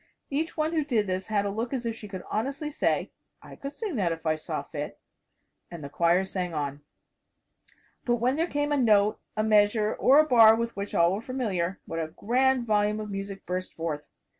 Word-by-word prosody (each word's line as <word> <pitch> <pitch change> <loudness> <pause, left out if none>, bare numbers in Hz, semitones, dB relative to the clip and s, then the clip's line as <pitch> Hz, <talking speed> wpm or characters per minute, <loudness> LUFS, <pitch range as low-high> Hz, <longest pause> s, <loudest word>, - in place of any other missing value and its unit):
Each 315 +5 -2
one 310 +1 0
who 315 -2 +1
did 235 -7 +1
this 185 0 -3
had 205 -2 0
a 200 - -1
look 230 +5 -3
as 245 -2 -4
if 230 -1 -2
she 215 - -10
could 190 -2 -7
honestly 280 +7 -2
say, - - 0 0.3
"I - - -11
could 275 - -6
sing 370 - -4
that 180 -5 +1
if 165 0 -5
I 155 - +3
saw 155 - -4
fit" - - -6 0.7
and 170 -3 -8
the 140 - -6
choir 170 +5 +2
sang 180 -3 -4
on. 145 -1 -3 1.2
But 240 - +2
when 245 +3 +1
there 330 +3 0
came 290 -2 -1
a 290 - +2
note, 215 -4 +3 0.2
a 215 - +2
measure 210 0 +3
or 275 +3 +5
a 310 - +6
bar 225 -5 +7
with 235 +1 -3
which 200 0 -5
all 170 +1 +4
were 200 - -3
familiar, 200 -8 -2
what 165 - -4
a 160 - -2
grand 250 +8 +1
volume 210 -1 +1
of 210 -1 -5
music 195 0 -6
burst 185 +1 -4
forth. 160 -3 -3
215 Hz, 215 wpm, -27 LUFS, 185-255 Hz, 1.2 s, bar